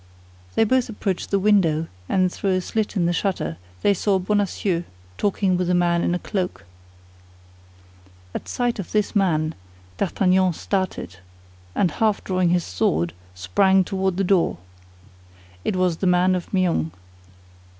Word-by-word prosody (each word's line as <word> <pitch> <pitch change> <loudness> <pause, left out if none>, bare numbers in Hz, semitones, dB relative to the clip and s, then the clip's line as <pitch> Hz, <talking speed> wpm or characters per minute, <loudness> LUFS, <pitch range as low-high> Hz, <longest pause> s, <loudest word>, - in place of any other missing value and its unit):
They - - +4
both 255 +2 +2
approached 195 -4 -3
the 200 - +2
window, 190 -6 +3 0.2
and 185 -1 +2
through 195 -2 0
a 185 - 0
slit 215 +3 -2
in 180 -4 +2
the 175 - +1
shutter 185 - -1 0.3
they 200 - +5
saw 195 +1 +1
Bonacieux 190 -2 0 0.4
talking 195 -2 +1
with 180 -1 -1
a 180 - +3
man 175 -1 +2
in 175 - +1
a - - +1
cloak. 180 - -3 1.7
At - - -5
sight 245 -3 -1
of 195 - -6
this 210 +1 0
man, 160 -5 +2 0.5
D'Artagnan 185 -1 +2
started, 185 - -3 0.6
and 180 -5 +2
half 215 +4 +1
drawing 185 -2 +1
his 175 0 +2
sword, 85 - 0 0.2
sprang 190 - +3
toward 190 0 -1
the 195 - +1
door. 180 - +2 1.1
It - - -1
was 180 -3 +1
the 190 - 0
man 180 +1 +4
of 180 -2 -3
Meung. 175 - +1
185 Hz, 150 wpm, -23 LUFS, 175-200 Hz, 1.7 s, they